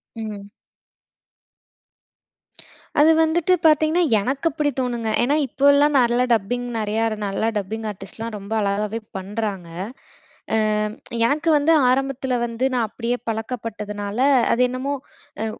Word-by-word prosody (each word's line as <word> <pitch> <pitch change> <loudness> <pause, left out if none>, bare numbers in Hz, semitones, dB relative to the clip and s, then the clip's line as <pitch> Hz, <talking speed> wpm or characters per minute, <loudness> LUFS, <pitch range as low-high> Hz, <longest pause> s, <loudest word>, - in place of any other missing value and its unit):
ம். 210 -3 -7 2.5
அது 310 +2 +7
வந்துட்டு 335 +3 +2
பார்த்தீங்கன்னா, 310 +3 +3 0.2
எனக்கு 270 +9 -1
அப்படி 295 0 0
தோணுங்க. 240 -3 -2
ஏன்னா 285 +4 +2
இப்போல்லாம், 285 +3 +4
நல்ல 240 0 +2
டப்பிங் 245 +3 -1
நெறையா 215 +1 -1
இரு 215 - -4
நல்ல 195 +2 -2
டப்பிங் 220 +3 -4
ஆர்டிஸ்ட்லாம் 215 +3 -8
ரொம்ப 200 +2 -6
அழகாவே 205 +2 -1 0.2
பண்றாங்க. 195 -2 -4 0.9
அ - - +3 0.7
எனக்கு 300 +7 +1
வந்து 295 +3 +2 0.2
ஆரம்பத்துல 265 0 0
வந்து 235 +2 -2
நான் 240 -3 +1
அப்படியே 235 +2 -2
பழக்கப்பட்டதுனால, 215 -2 -4 0.3
அது 245 - +2
என்னமோ 260 +3 -3 0.5
அ - - 0
230 Hz, 115 wpm, -22 LUFS, 210-275 Hz, 2.5 s, அது